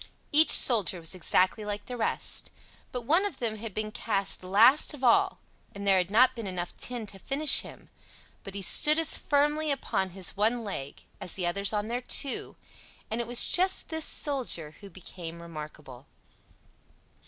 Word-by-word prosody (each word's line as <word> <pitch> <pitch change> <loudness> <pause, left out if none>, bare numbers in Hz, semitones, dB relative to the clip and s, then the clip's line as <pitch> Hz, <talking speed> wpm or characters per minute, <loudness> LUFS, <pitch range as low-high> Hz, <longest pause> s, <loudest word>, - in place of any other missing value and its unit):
Each 310 +2 +5
soldier 210 -7 +4
was 165 +1 -4
exactly 185 +3 +1
like 205 0 -5
the 250 - -7
rest; 235 - 0 0.4
but 250 - -5
one 325 - +2
of 405 -9 -4
them 230 -4 -3
had 225 0 -7
been 215 0 -3
cast 200 -3 -2
last 225 +11 +4
of 265 - -14
all, 240 -2 +3 0.4
and 200 0 -7
there 190 -1 +5
had 180 0 -2
not 250 +5 +4
been 230 -4 -6
enough 180 -2 -5
tin 245 -3 -4
to 195 -1 -10
finish 275 +6 +2
him; - - -12 0.6
but 195 -1 -10
he 200 - -5
stood 300 - +5
as 325 -1 +3
firmly 295 +2 0
upon 190 -8 -2
his 185 -1 -2
one 225 +4 0
leg 140 -10 -7 0.2
as 180 - -4
the 185 - -3
others 200 +3 +2
on 210 0 -2
their 240 +2 -3
two; 270 +2 -1 0.6
and 225 +2 -2
it 235 - -6
was 240 0 +5
just 375 +1 +1
this 320 -1 -1
soldier 240 - -1
who 200 - -11
became 170 -2 -10
remarkable. 150 -5 -11
215 Hz, 175 wpm, -27 LUFS, 185-260 Hz, 0.6 s, Each